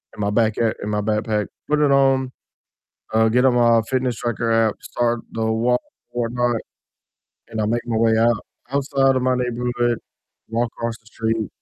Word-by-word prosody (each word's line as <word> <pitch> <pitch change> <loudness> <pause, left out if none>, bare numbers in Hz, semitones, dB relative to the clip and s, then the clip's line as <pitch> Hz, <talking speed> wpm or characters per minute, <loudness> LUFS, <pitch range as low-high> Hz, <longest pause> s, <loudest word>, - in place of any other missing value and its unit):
in - - -14
my 100 0 0
back 110 -1 +2
a 115 -2 +2
in 105 - -3
my 105 0 0
backpack, 105 0 0 0.2
put 150 0 +2
it 145 -2 +4
on, 135 -1 +3 0.8
uh, 110 0 +4
get 125 +3 +3
on 125 - +4
my 115 -1 +5
fitness 130 -3 0
tracker 115 -1 -2
app, 115 -2 +2
start 120 -1 -1
the 110 0 -1
walk 115 +3 +2 0.3
or 120 -1 -1
whatnot, 120 -1 0 0.9
and 110 - -4
I 105 - +1
make 120 +2 -1
my 115 -2 -1
way 115 -1 +3
out 115 -1 +3 0.3
outside 135 -1 +2
of 130 - +1
my 130 0 +2
neighborhood, 120 -1 0 0.5
walk 115 +1 0
across 115 -1 -3
the 110 - -32
street 110 -2 -2
115 Hz, 185 wpm, -21 LUFS, 110-125 Hz, 0.9 s, my